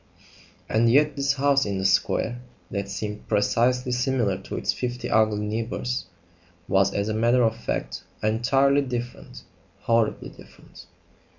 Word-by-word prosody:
And 115 +1 +3
yet 150 +2 +4
this 140 -1 +1
house 140 0 +2
in 100 -2 -2
the 95 - -2
square, 120 +5 +1 0.3
that 100 -3 -3
seemed 105 +1 -5
precisely 125 +4 +1
similar 125 -5 +1
to 95 - -7
its - - 0
fifty 125 -1 -4
ugly 110 -1 +2
neighbours, 115 +3 -3 0.6
was 100 0 +3
as 100 +1 -1
a 110 - -1
matter 120 +3 +3
of 115 -1 +2
fact - - -4 0.2
entirely 135 +6 +3
different 120 - -6 0.4
horribly 115 -1 0
different. - - -16
115 Hz, 135 wpm, -25 LUFS, 105-125 Hz, 0.6 s, yet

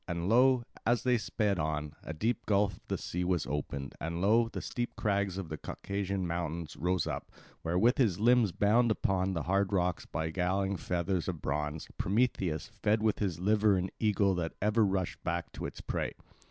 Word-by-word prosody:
And 85 0 -2
lo, 125 +3 +5 0.2
as 120 -1 +2
they 125 -2 +3
sped 105 -3 0
on, 75 -1 -2
a - - -6
deep 110 +8 -1
gulf 100 -1 +2
of - - -25
the - - -1
sea 90 +1 -3
was 90 -3 +1
opened, 70 -2 -4
and 85 +1 -3
lo, 115 +5 +4
the - - -5
steep 120 0 -4
crags 100 -2 0
of 95 -4 -5
the 80 - -4
Caucasian 100 -1 -3
mountains 85 -2 -3
rose 90 0 0
up, - - -4 0.3
where, 85 +2 -1
with 120 +8 +4
his 105 -9 +3
limbs 120 -2 +4
bound 115 +6 +3
upon 95 -3 +1
the 85 - -1
hard 95 +3 +1
rocks 90 -2 0
by 80 +1 -2
galling 95 +3 0
fetters 90 0 -1
of 90 -4 -3
bronze, 75 +2 -2
Prometheus 95 -5 0
fed 110 +1 +2
with 110 -1 +2
his 95 -6 -1
liver 105 +1 +3
an 90 +1 -2
eagle 100 -3 +3
that 85 -2 -2
ever 105 +2 +3
rushed 95 -3 -1
back 85 -1 -2
to - - -5
its - - -9
prey. - - -2
95 Hz, 195 wpm, -31 LUFS, 85-105 Hz, 0.3 s, lo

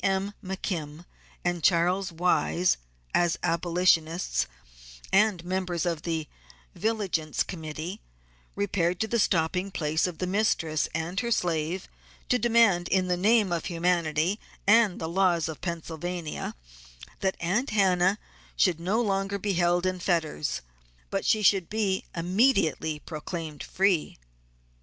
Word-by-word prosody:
M. 195 +1 0
McKim 175 -4 -4 0.4
and 175 -2 -1
Charles 180 +2 +2
Wise 180 +1 +2 0.4
as 175 -1 +2
abolitionists 170 0 +1 0.7
and 195 -3 +3
members 180 -1 -1
of 170 -3 -1
the 160 -2 -2 0.5
Vigilance 195 -8 -1
Committee 160 +3 -6 0.5
repaired 180 -3 0
to 220 - 0
the 235 +2 0
stopping 180 0 +1
place 160 -2 0
of 175 -3 -6
the 185 - -2
mistress 180 -6 +1
and 165 +4 -2
her 235 - -2
slave 175 -3 -1 0.4
to 250 - +3
demand 225 -7 +4
in 185 -1 +1
the 180 - +3
name 205 +1 +3
of 170 -1 -1
humanity 170 +1 +1 0.3
and 215 -2 +4
the 160 - -3
laws 170 -2 +2
of 160 -2 -7
Pennsylvania 170 -1 -4 0.6
that 190 -1 0
Aunt 200 +10 0
Hannah 190 -1 +3 0.4
should 155 - +3
be 165 - -11
no 200 +6 +1
longer 195 -2 -1
held 175 0 +2
in 185 0 -1
fetters 165 -4 -1 0.5
but - - +1
that - - -9
she 215 -1 +3
should 190 -3 +4
be 205 -3 0
immediately 180 - +2
proclaimed 155 0 -6
free. 190 -4 +1
180 Hz, 130 wpm, -27 LUFS, 165-195 Hz, 0.7 s, demand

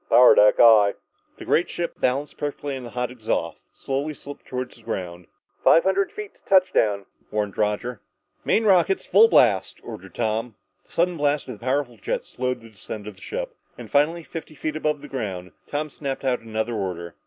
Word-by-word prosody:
"Power 125 0 +8
deck, 105 0 +5
aye." 110 -4 +7 0.4
The - - -9
great 170 - +2
ship, 175 - -3
balanced 135 +3 -1
perfectly 145 -1 -3
on 130 - -7
the 120 - -7
hot 125 +1 -3
exhaust, 110 -8 -3
slowly 140 +3 -3
slipped 145 0 -10
toward 130 0 -4
the 115 - -15
ground. 90 -5 -5 0.4
"Five 165 - +6
hundred 190 +1 +1
feet 210 -2 -8
to - - -31
touchdown," 110 - +3 0.2
warned 105 -2 -2
Roger. 105 +2 -1 0.4
"Main 225 - +2
rockets 190 -2 +3
full 215 +4 +6
blast," 105 - +3
ordered 95 +1 -10
Tom. 115 0 -1 0.3
The - - -24
sudden 175 0 +1
blast 145 0 0
of 115 -5 -7
the - - -16
powerful 130 -2 -1
jets - - -3
slowed 125 -1 -2
the 115 - -13
descent 105 0 -8
of 105 - -6
the - - -20
ship, - - -5 0.2
and - - -10
finally, 160 +4 +2
fifty 160 -1 -8
feet 155 +2 -3
above 150 -2 -1
the - - -8
ground, 95 -8 -5 0.2
Tom 150 +1 -3
snapped 135 -1 -5
out 125 -2 +1
another 110 +1 -3
order. 90 -5 -4
125 Hz, 190 wpm, -24 LUFS, 105-150 Hz, 0.4 s, Power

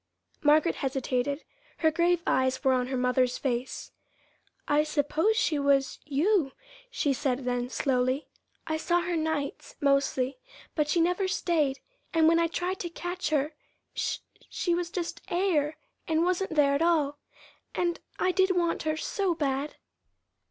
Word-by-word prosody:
Margaret 305 +2 +4
hesitated. 270 +1 -1 0.3
Her 320 -1 +3
grave 345 +1 +2
eyes 260 +1 +1
were 265 -2 +4
on 250 -1 +1
her 260 0 -2
mother's 250 0 +2
face. 250 -1 -3 0.8
"I 290 +1 +4
suppose 310 +7 +1
she 310 -9 +2
was 280 -1 +2
you," 300 +1 +2 0.4
she 300 - 0
said 265 -2 -1
then 245 0 -1
slowly. 255 +2 0 0.4
"I 315 - -1
saw 345 +2 +1
her 350 0 -2
nights, 315 -3 -2
mostly; 275 -2 +1 0.3
but 300 -2 +1
she 335 - +2
never 360 +3 +2
stayed, 310 -7 0 0.3
and 320 -1 +5
when 330 +1 +5
I 335 - +3
tried 360 +3 -2
to 345 - -3
catch 350 -1 -4
her, 300 0 0 0.4
she - - -1 0.3
she 350 - 0
was 345 0 -1
just 340 -1 -4
air 340 -5 +1 0.3
and 320 0 +2
wasn't 365 -1 0
there 285 -2 +4
at 280 - +1
all. 305 -4 +2 0.6
And 345 -1 0 0.2
I 370 - +2
did 380 0 +2
want 340 -1 +1
her 310 0 -1
so 380 +1 -1
bad!" 280 -1 -1
305 Hz, 150 wpm, -28 LUFS, 275-345 Hz, 0.8 s, and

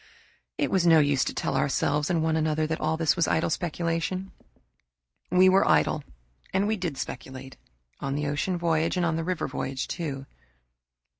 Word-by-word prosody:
It - - 0
was 190 -3 +2
no 165 -1 +7
use 145 -3 +3
to - - -2
tell - - -2
ourselves 145 +2 +1
and 165 -3 +1
one 160 0 +1
another 155 0 +1
that 160 +1 -3
all 160 +1 0
this 165 -2 +2
was 170 - +1
idle 160 - +1
speculation. 170 +3 -2 1.0
We 185 +1 +5
were 190 +1 +5
idle 150 - +2 0.5
and 190 +1 +1
we 220 +1 +1
did 175 -8 -4
speculate, 130 0 -7 0.4
on 135 0 -3
the 150 +1 -2
ocean 150 +6 -1
voyage 165 0 0
and 180 - +1
the 165 - -2
river 180 0 -2
voyage, 130 0 -4
too. 140 -5 -4
160 Hz, 170 wpm, -26 LUFS, 145-175 Hz, 1.0 s, no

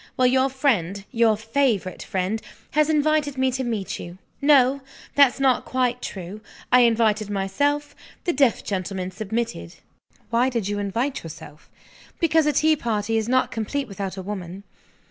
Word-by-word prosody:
Well, 255 - +3
your 260 +1 +3
friend, 205 - 0
your 230 -3 +3
favorite 225 -5 0
friend, 190 +4 -2 0.3
has 305 +1 +2
invited 305 -2 +1
me 260 0 +2
to 260 +1 -2
meet 225 -6 -3
you. 175 +1 -8 0.2
No! 280 -1 +4 0.3
that's 275 -2 +5
not 265 -2 +3
quite 250 -1 -1
true. 190 +2 -7 0.3
I 250 - +7
invited 220 -3 +3
myself 285 +10 -1 0.3
the 350 - 0
deaf 270 -5 +2
gentleman 185 -1 -3
submitted." 215 - -4 0.6
"Why 240 +3 +3
did 230 -6 -2
you 205 0 -2
invite 235 +8 -2
yourself?" 150 -2 -11 0.5
"Because 320 -2 +3
a 300 - +2
tea 310 +3 +4
party 225 -4 -1
is 220 +1 0
not 255 0 +2
complete 255 +5 -3
without 195 -2 -5
a 190 - -5
woman." 190 -1 -6
235 Hz, 155 wpm, -23 LUFS, 200-270 Hz, 0.6 s, I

